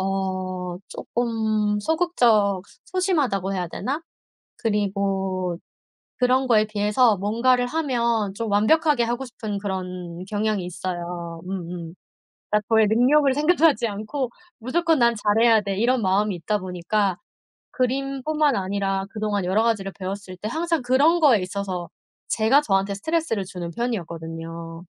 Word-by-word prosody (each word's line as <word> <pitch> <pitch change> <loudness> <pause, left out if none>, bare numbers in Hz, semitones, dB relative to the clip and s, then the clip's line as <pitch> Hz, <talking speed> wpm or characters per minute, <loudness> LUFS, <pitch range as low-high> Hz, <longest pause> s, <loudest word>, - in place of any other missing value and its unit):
어 185 -2 -2
쪼끔 220 -3 -1
소극적 225 - +2
소 - - -20 0.3
소심하다고 275 - +1
해야 180 -2 -2
되나? 275 - -3 0.6
그리고 195 -4 -1 0.6
그런 255 +1 +2
거에 215 -3 +4
비해서 210 +2 +3
뭔가를 235 +6 +2
하면 235 -8 0
좀 225 +1 -3
완벽하게 255 +6 +3
하고 240 +3 -2
싶은 220 -4 -5
그런 180 -3 -5
경향이 210 -2 0
있어요. 175 -1 -5
음음. 175 -3 -5 0.6
아 210 - +4
저의 220 -1 +5
능력을 265 +6 +4
생각하지 300 -4 +3
않고 220 +6 -3 0.3
'무조건 320 +6 +1
난 235 0 +4
잘해야 220 +2 +4
돼.' 200 -1 -3
이런 245 +2 +2
마음이 200 +1 +2
있다 190 +5 -1
보니까 185 +1 -1 0.6
그림뿐만 275 +3 0
아니라 195 0 -1
그동안 210 -3 -2
여러 190 +5 +2
가지를 200 -4 0
배웠을 190 0 -5
때 210 - -4
항상 330 +3 -1
그런 285 +8 +3
거에 265 -9 +5
있어서 185 -2 -4 0.4
제가 225 +6 +4
저한테 195 -4 +1
스트레스를 305 -2 -1
주는 180 -2 -6
편이었거든요. 165 -5 -5
210 Hz, 305 characters per minute, -23 LUFS, 190-250 Hz, 0.6 s, 저의